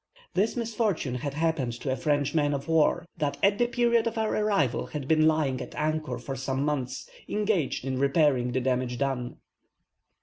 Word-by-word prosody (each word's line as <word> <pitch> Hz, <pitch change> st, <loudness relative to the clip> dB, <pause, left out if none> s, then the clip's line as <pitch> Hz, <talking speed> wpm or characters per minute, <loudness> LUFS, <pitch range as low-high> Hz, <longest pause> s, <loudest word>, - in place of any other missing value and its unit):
This 210 Hz, +6 st, +1 dB
misfortune 220 Hz, -, -1 dB
had 140 Hz, +3 st, -4 dB
happened 160 Hz, -6 st, 0 dB
to 130 Hz, +3 st, -4 dB
a -, -, +1 dB
French 145 Hz, +2 st, 0 dB
man 145 Hz, -2 st, +2 dB
of 140 Hz, 0 st, -5 dB
war, 165 Hz, +1 st, +3 dB
that 145 Hz, -3 st, -1 dB
at 200 Hz, +1 st, +4 dB
the 240 Hz, -, +3 dB
period 235 Hz, -1 st, +2 dB
of 230 Hz, 0 st, -3 dB
our 220 Hz, -1 st, 0 dB
arrival 200 Hz, -, +1 dB
had 145 Hz, -4 st, -5 dB
been 155 Hz, 0 st, +4 dB
lying 145 Hz, -5 st, +1 dB
at -, -, -8 dB
anchor 155 Hz, 0 st, -1 dB
for 135 Hz, -, -6 dB
some 135 Hz, +1 st, -2 dB
months, 130 Hz, -4 st, -2 dB, 0.2 s
engaged 205 Hz, -11 st, 0 dB
in 130 Hz, -1 st, -2 dB
repairing 140 Hz, -3 st, +2 dB
the 130 Hz, +1 st, 0 dB
damage 125 Hz, -1 st, 0 dB
done. 135 Hz, -3 st, -2 dB
150 Hz, 180 wpm, -27 LUFS, 130-175 Hz, 0.2 s, at